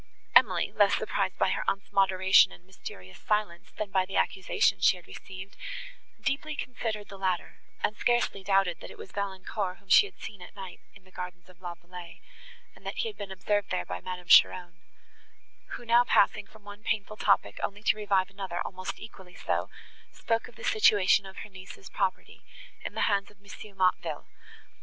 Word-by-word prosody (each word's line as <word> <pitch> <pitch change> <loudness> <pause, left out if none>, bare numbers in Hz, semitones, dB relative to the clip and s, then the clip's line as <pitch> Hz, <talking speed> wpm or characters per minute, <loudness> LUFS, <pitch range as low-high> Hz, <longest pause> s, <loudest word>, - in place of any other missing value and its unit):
Emily, - - +5
less - - +5
surprised - - -1
by - - +2
her - - -1
aunt's 195 0 -1
moderation 190 -1 +5
and 175 - -14
mysterious 95 - -10
silence, 210 -5 -1
than 210 -2 -3
by 190 -1 +3
the 190 +1 -7
accusation 190 - +2
she 185 - +4
had 175 - -15
received, 190 +1 -10 0.6
deeply 300 +2 -1
considered 225 -6 -4
the 195 - -10
latter, 185 -2 -2 0.2
and 210 - +1
scarcely 240 -5 +1
doubted, 195 -3 +2
that - - -9
it - - -12
was 190 - -10
Valancourt 195 -1 -3
whom 200 - -26
she 410 - +7
had - - -19
seen 205 -3 -8
at 180 - -12
night 190 -2 -8 0.2
in 205 - -16
the 185 - -21
gardens 180 0 -8
of 185 0 -19
La 175 -1 -5
Vallée, 175 0 -11 0.6
and - - -19
that - - -5
he 460 - 0
had 425 - -10
been 200 - -7
observed 205 +2 0
there 90 - -1
by 90 0 -5
Madame 180 -1 -6
Cheron; 175 0 +6 1.0
who 240 - -7
now 235 +1 +6
passing - - +3
from 220 -1 -18
one 205 0 -10
painful 215 -1 -2
topic 195 - +2
only 205 +1 -4
to - - +4
revive 195 -3 +1
another 190 -3 -5
almost 185 0 -5
equally 190 -4 -12
so, - - -1 0.4
spoke 230 0 -1
of 240 - -16
the - - -12
situation 205 -2 +4
of 190 - -12
her - - -10
niece's 190 0 -11
property, 190 -3 -2 0.4
in - - -6
the - - -1
hands 200 -1 +2
of 205 - -21
M. 200 0 -12
Motteville. 175 -4 +1
195 Hz, 190 wpm, -29 LUFS, 185-210 Hz, 1.0 s, she